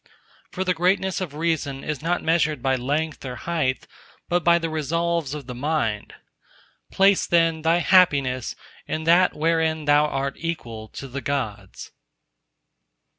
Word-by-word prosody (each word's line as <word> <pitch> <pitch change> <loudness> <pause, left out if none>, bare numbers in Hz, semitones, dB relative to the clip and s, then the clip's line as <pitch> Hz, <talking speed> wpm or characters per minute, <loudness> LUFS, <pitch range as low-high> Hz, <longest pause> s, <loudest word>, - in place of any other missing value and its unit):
For 190 - -3
the 185 -1 +1
greatness 185 +2 +1
of 160 -6 -5
Reason 150 -4 -2
is 150 -3 -4
not 175 +2 -1
measured 160 -2 +1
by 135 -1 +2
length 145 +5 -2
or 125 -2 -5
height, 155 -3 -2 0.4
but 175 -1 +1
by 170 +1 +5
the 165 -1 -2
resolves 160 -1 -1
of 145 -3 -7
the 125 - -7
mind. 125 -6 -2 0.8
Place 195 0 +3
then 165 -2 +2
thy 165 +2 +3
happiness 145 -8 +3 0.3
in 155 - -3
that 175 +3 +4
wherein 160 -1 0
thou 145 +1 +4
art 140 -1 -3
equal 120 -10 -5
to 135 - -9
the 135 +2 -6
Gods. 110 -9 -4
155 Hz, 145 wpm, -23 LUFS, 135-170 Hz, 0.8 s, by